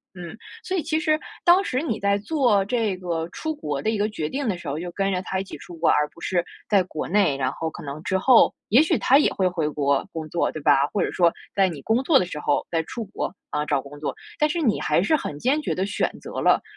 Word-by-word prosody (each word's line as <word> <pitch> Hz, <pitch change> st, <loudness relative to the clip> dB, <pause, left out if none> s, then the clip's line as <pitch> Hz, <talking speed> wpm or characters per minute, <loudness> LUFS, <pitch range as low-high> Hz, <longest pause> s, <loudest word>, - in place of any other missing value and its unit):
嗯， 175 Hz, +2 st, -8 dB, 0.3 s
所 375 Hz, 0 st, -2 dB
以 325 Hz, -, -1 dB
其 315 Hz, 0 st, 0 dB
实 310 Hz, -2 st, +1 dB, 0.2 s
当 360 Hz, +2 st, +6 dB
时 255 Hz, -4 st, -1 dB
你 230 Hz, -9 st, -2 dB
在 200 Hz, 0 st, +1 dB
做 220 Hz, -4 st, +2 dB
这 220 Hz, -4 st, 0 dB
个 170 Hz, -2 st, -3 dB
出 315 Hz, -, -4 dB
国 145 Hz, -, -4 dB
的 220 Hz, -, 0 dB
一 220 Hz, -, 0 dB
个 210 Hz, +1 st, +1 dB
决 155 Hz, -7 st, -4 dB
定 275 Hz, -3 st, -3 dB
的 195 Hz, -, 0 dB
时 170 Hz, -, -9 dB
候， 140 Hz, +2 st, -2 dB
就 175 Hz, 0 st, -5 dB
跟 195 Hz, +2 st, -1 dB
着 180 Hz, -, 0 dB
他 190 Hz, -, -2 dB
一 -, -, -2 dB
起 -, -, -9 dB
出 175 Hz, -, -11 dB
国， 165 Hz, -, +2 dB
而 150 Hz, 0 st, +3 dB
不 170 Hz, -, -18 dB
是 175 Hz, -2 st, 0 dB, 0.2 s
在 200 Hz, -3 st, +4 dB
国 160 Hz, -4 st, -5 dB
内， 190 Hz, -7 st, +2 dB
然 130 Hz, -1 st, -1 dB
后 160 Hz, -, -4 dB
可 -, -, -10 dB
能 150 Hz, +2 st, -7 dB
之 190 Hz, -, -1 dB
后 255 Hz, +1 st, +5 dB, 0.2 s
也 235 Hz, +6 st, +6 dB
许 315 Hz, -, +3 dB
他 275 Hz, -, +4 dB
也 295 Hz, -, +3 dB
会 190 Hz, -1 st, +1 dB
回 165 Hz, -4 st, -1 dB
国 140 Hz, +1 st, 0 dB
工 160 Hz, -2 st, -5 dB
作， 170 Hz, -, 0 dB
对 155 Hz, -, -7 dB
吧？ 140 Hz, 0 st, +4 dB
或 205 Hz, -, +1 dB
者 -, -, -2 dB
说 170 Hz, -2 st, +3 dB, 0.2 s
在 195 Hz, -1 st, +4 dB
你 155 Hz, -6 st, -6 dB
工 230 Hz, -, +1 dB
作 285 Hz, -1 st, +5 dB
的 180 Hz, -, -1 dB
时 150 Hz, -, -6 dB
候 145 Hz, -1 st, +1 dB
再 165 Hz, -1 st, 0 dB
出 230 Hz, +7 st, -6 dB
国， 200 Hz, -, -4 dB, 0.2 s
啊， 150 Hz, -, -1 dB
找 140 Hz, -3 st, 0 dB
工 145 Hz, +2 st, -12 dB
作， 150 Hz, -, -3 dB, 0.2 s
但 300 Hz, -, +3 dB
是 340 Hz, +3 st, -2 dB
你 225 Hz, -8 st, +2 dB
还 150 Hz, +3 st, +2 dB
是 310 Hz, +11 st, +3 dB
很 150 Hz, -, -4 dB
坚 280 Hz, -, +2 dB
决 300 Hz, -, -2 dB
地 185 Hz, -, -1 dB
选 205 Hz, -, -1 dB
择 -, -, -6 dB
了 -, -, +4 dB
190 Hz, 295 characters per minute, -24 LUFS, 155-240 Hz, 0.3 s, 当